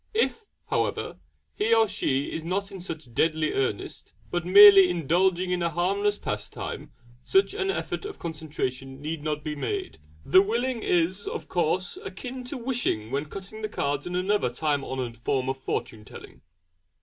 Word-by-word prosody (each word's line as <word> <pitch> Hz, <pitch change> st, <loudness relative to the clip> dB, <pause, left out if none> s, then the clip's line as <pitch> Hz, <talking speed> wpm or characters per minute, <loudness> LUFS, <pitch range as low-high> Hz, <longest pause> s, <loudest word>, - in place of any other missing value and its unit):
If, 450 Hz, 0 st, +1 dB, 0.3 s
however, -, -, -1 dB, 0.3 s
he 225 Hz, +2 st, +2 dB
or 225 Hz, -1 st, +4 dB
she 135 Hz, -7 st, -1 dB
is 160 Hz, -, -4 dB
not 195 Hz, +4 st, -2 dB
in 190 Hz, -2 st, -8 dB
such 160 Hz, -8 st, -7 dB
deadly 155 Hz, +3 st, +1 dB
earnest, 130 Hz, -6 st, -3 dB, 0.2 s
but 175 Hz, 0 st, -2 dB
merely 195 Hz, -1 st, +10 dB
indulging 180 Hz, +2 st, +1 dB
in 180 Hz, -1 st, 0 dB
a 170 Hz, -, +1 dB
harmless 200 Hz, +5 st, 0 dB
pastime, 105 Hz, -, -5 dB, 0.3 s
such 385 Hz, 0 st, +3 dB
an 390 Hz, -2 st, -1 dB
effort 390 Hz, -, -3 dB
of 415 Hz, -, -6 dB
concentration 135 Hz, -5 st, -4 dB
need 155 Hz, +1 st, -4 dB
not 150 Hz, -1 st, -2 dB
be 150 Hz, 0 st, -3 dB
made. 385 Hz, -, -4 dB, 0.3 s
The 185 Hz, +7 st, +7 dB
'willing' 235 Hz, +4 st, -1 dB
is, 180 Hz, +2 st, +1 dB
of -, -, -5 dB
course, 175 Hz, +1 st, 0 dB
akin 250 Hz, +6 st, -7 dB
to 270 Hz, +3 st, -4 dB
'wishing' 235 Hz, -, -1 dB
when 140 Hz, +2 st, -1 dB
cutting 195 Hz, +4 st, -8 dB
the 215 Hz, -, -3 dB
cards 145 Hz, -5 st, -2 dB
in 180 Hz, -, -4 dB
another 190 Hz, -5 st, +1 dB
time 145 Hz, +3 st, -1 dB
honoured 125 Hz, -4 st, -4 dB
form 130 Hz, +2 st, -1 dB
of 135 Hz, 0 st, -3 dB
fortune 110 Hz, -4 st, -4 dB
telling. -, -, -13 dB
175 Hz, 165 wpm, -26 LUFS, 145-205 Hz, 0.3 s, merely